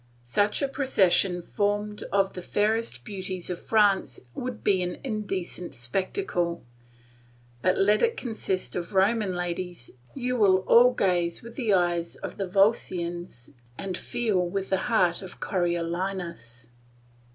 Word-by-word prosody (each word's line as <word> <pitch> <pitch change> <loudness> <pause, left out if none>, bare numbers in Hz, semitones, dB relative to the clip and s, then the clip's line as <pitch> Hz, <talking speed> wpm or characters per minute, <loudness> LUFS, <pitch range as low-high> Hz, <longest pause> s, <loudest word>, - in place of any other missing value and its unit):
Such 205 - +1
a - - +2
procession 195 -9 +2
formed 205 +2 -1
of 195 -1 +2
the 180 - -6
fairest 210 - 0
beauties 185 -2 -4
of 175 - -5
France 200 - +2
would 245 -2 -5
be 190 -2 +3
an 180 0 -3
indecent 195 -7 -4
spectacle; 170 - -2 1.0
but 185 +5 +2
let 205 +2 +4
it 465 0 +2
consist 220 -6 -3
of 175 +2 -4
Roman 200 0 +2
ladies, 175 -5 -4 0.2
you 250 -1 -1
will 190 -4 +5
all 245 +2 +7
gaze 175 -7 0
with 235 0 -10
the 225 -7 +2
eyes 175 -2 0
of - - -7
the 195 - -2
Volscians 175 - 0 0.3
and 190 -2 -4
feel 215 0 -1
with 190 +2 -3
the 190 - +4
heart 185 -7 +2
of 190 -2 -10
Coriolanus. 170 - -2
190 Hz, 135 wpm, -27 LUFS, 175-210 Hz, 1.0 s, all